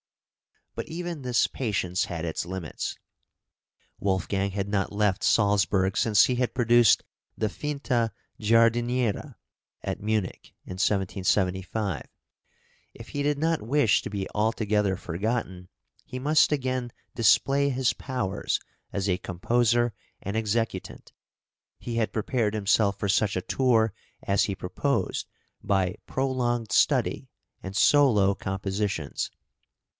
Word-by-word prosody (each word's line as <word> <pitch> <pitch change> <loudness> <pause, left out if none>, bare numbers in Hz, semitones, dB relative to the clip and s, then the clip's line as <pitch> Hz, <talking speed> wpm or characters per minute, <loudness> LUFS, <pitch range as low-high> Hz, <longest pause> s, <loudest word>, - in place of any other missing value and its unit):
But - - -5
even 170 -2 -5
this 125 -3 +2
patience 95 -7 -1
had 85 -1 -4
its 80 - -2
limits. 90 -2 -5 1.0
Wolfgang 95 0 0
had 100 0 -2
not 100 -1 -1
left 105 -2 +1
Salzburg 100 -2 +2
since 105 -3 +5
he 125 - 0
had 125 0 -1
produced 120 -3 +5 0.3
the 110 - 0
"Finta 130 -5 -1 0.3
Giardiniera" 115 +1 +2 0.5
at - - -4
Munich, 105 -2 -2
in 90 - -7
1775; 95 -1 0 0.9
if - - -11
he 145 - -3
did 145 0 +1
not 160 +2 0
wish 120 -1 +3
to - - -6
be 100 -2 -3
altogether 105 -2 +1
forgotten, 95 0 -3 0.4
he 125 - -7
must 150 +5 +3
again 130 -4 -1 0.2
display 135 +5 +3
his 130 -1 +1
powers 125 -8 -2 0.3
as 100 0 -1
a 90 -2 +1
composer 120 +5 +1 0.3
and 100 +2 -4
executant. 110 -3 -2 0.7
He 120 -1 -5
had 110 -2 0
prepared 110 -1 0
himself 100 -1 +2
for 100 - -2
such 100 +1 +2
a 95 - 0
tour 115 -2 +2 0.3
as 100 0 +2
he 100 - -3
proposed 90 -1 -2 0.3
by 95 -2 0
prolonged 125 -4 -1
study - - +2 0.3
and 95 0 -7
solo 110 -7 +5
compositions. 95 -4 -3
105 Hz, 120 wpm, -26 LUFS, 95-120 Hz, 1.0 s, since